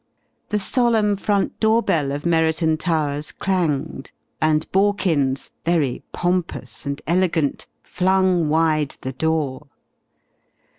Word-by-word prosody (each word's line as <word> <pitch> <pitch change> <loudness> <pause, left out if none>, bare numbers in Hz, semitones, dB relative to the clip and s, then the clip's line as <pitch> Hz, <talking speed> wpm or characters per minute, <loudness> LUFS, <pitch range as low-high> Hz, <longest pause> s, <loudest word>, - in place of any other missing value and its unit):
The 210 - 0
solemn 220 -1 +2
front 200 0 -1
door 220 +1 +3
bell 145 -4 0
of 145 +2 -4
Merriton 160 -1 +2
Towers 150 -3 -1
clanged, 160 -8 -2 0.3
and 155 -1 +2
Borkins, 185 -9 +1
very 160 -7 0
pompous 175 -4 -2
and 140 0 -3
elegant, 170 -4 0 0.2
flung 185 -3 +1
wide 155 -2 +1
the 130 - -5
door. 150 -1 -1
160 Hz, 105 wpm, -21 LUFS, 150-190 Hz, 0.3 s, door